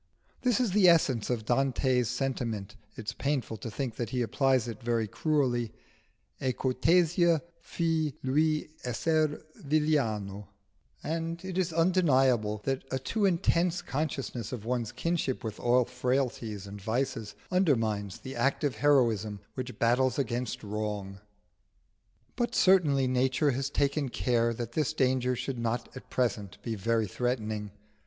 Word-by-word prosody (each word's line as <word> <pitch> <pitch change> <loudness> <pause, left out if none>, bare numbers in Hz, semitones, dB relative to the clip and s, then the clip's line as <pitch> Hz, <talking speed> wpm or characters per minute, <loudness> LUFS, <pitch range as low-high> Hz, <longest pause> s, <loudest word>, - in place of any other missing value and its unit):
This 245 -2 +2
is 245 -6 +1
the 190 -2 +6
essence 135 -9 +3
of 115 -3 -1
Dante's 130 -1 +2
sentiment 120 -6 -2 0.2
(it 115 - -7
is - - -3
painful 140 -5 -1
to 115 - -6
think 120 0 -4
that 120 - -2
he 125 -2 0
applies 130 +1 +2
it 115 -3 -6
very 115 -2 0
cruelly) 125 -3 0 0.7
"E 130 -1 +1
cortesia 165 +6 +3 0.2
fù, 165 -3 0
lui 155 +4 +1 0.2
esser 155 +5 0
villano" 115 - 0 0.6
and 165 +2 -3
it 190 -1 -5
is 180 -2 0
undeniable 135 - +3
that 135 0 -1
a 130 - -1
too 205 - -1
intense 175 -1 +2
consciousness 135 - -3
of 115 -4 -6
one's 120 -2 -1
kinship 165 -6 -1
with 110 -2 -5
all 125 +1 +3
frailties 125 -4 -2
and 100 0 -9
vices 115 0 -2 0.2
undermines 115 - +1
the 130 0 -7
active 135 -2 0
heroism 115 -7 +2
which 125 -1 -6
battles 125 +2 +2
against 120 -4 -2
wrong. 105 -2 -4 1.2
But 240 0 -1
certainly 155 -8 +4
nature 130 +3 +2
has 135 +2 -2
taken 140 -1 0
care 120 -1 +1
that 115 0 -5
this 150 +2 0
danger 130 -3 +1
should 125 +1 -4
not 115 +1 -2
at 130 - -10
present 110 -6 -1
be 115 - -2
very 110 +2 +1
threatening. 110 -1 -2
130 Hz, 140 wpm, -29 LUFS, 115-150 Hz, 1.2 s, the